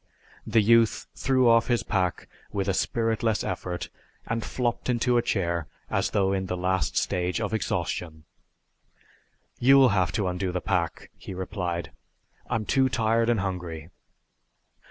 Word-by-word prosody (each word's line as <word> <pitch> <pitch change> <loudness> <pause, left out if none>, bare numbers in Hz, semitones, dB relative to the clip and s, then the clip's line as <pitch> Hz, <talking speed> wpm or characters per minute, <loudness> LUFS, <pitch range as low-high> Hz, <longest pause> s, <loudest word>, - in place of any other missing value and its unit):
The 110 - +4
youth 115 0 +4
threw 130 -2 +2
off 115 -1 +5
his 120 -2 +1
pack 95 -5 -1 0.2
with 100 -2 -2
a 95 - +2
spiritless 115 +1 0
effort 90 -1 -4 0.4
and 115 0 -2
flopped 120 +3 -2
into 120 0 +2
a 120 - +4
chair 85 -8 -1 0.2
as - - +1
though 95 -1 +1
in 95 -1 -2
the 90 - -2
last 95 +1 0
stage 90 +2 0
of 110 -1 -2
exhaustion. 80 -5 -2 1.4
"You'll 135 +1 +6
have 95 -3 +1
to 105 -4 0
undo 90 +1 -2
the 90 - -2
pack," 85 -3 -2
he 95 - -8
replied. 90 -4 -3 0.6
"I'm 110 -1 -1
too 130 +3 +2
tired 115 0 +1
and 115 -4 +2
hungry." 90 -4 -5
100 Hz, 145 wpm, -26 LUFS, 90-115 Hz, 1.4 s, You'll